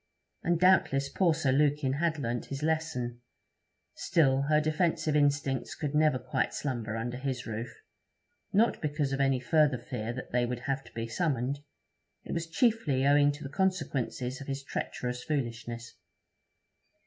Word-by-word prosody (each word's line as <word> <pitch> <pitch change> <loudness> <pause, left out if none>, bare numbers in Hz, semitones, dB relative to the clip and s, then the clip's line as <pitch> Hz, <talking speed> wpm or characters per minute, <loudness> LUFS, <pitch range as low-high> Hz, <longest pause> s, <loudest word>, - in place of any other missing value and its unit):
And 170 -1 +1
doubtless 155 -7 +4
poor 170 +1 +2
Sir 145 -5 +1
Lukin 145 -1 +2
had 160 +2 0
learnt 120 -4 -2
his 140 +1 -5
lesson; 155 -7 -1 0.7
still, 135 -5 +2
her 150 0 +5
defensive 155 0 +1
instincts 145 -2 +1
could 150 -2 -3
never 150 -3 +4
quite 125 - -1
slumber 115 -6 -3
under 120 +2 -3
his 130 -1 -3
roof; 115 +2 -4 0.8
not 220 +4 +3
because 145 -2 -1
of 135 - 0
any 135 -1 +3
further 145 +1 +3
fear 120 -2 -4
that 125 +1 -7
they 125 0 +2
would 125 0 -4
have 135 +1 -2
to - - -14
be 115 0 -3
summoned; 135 +1 -1 0.6
it - - -8
was 165 -1 -2
chiefly 165 - +2
owing 145 0 +5
to 150 +2 -9
the - - -4
consequences 140 -6 -1
of 135 - -8
his 135 0 -3
treacherous 125 -2 -4
foolishness. 120 -4 -3
140 Hz, 155 wpm, -30 LUFS, 125-155 Hz, 0.8 s, her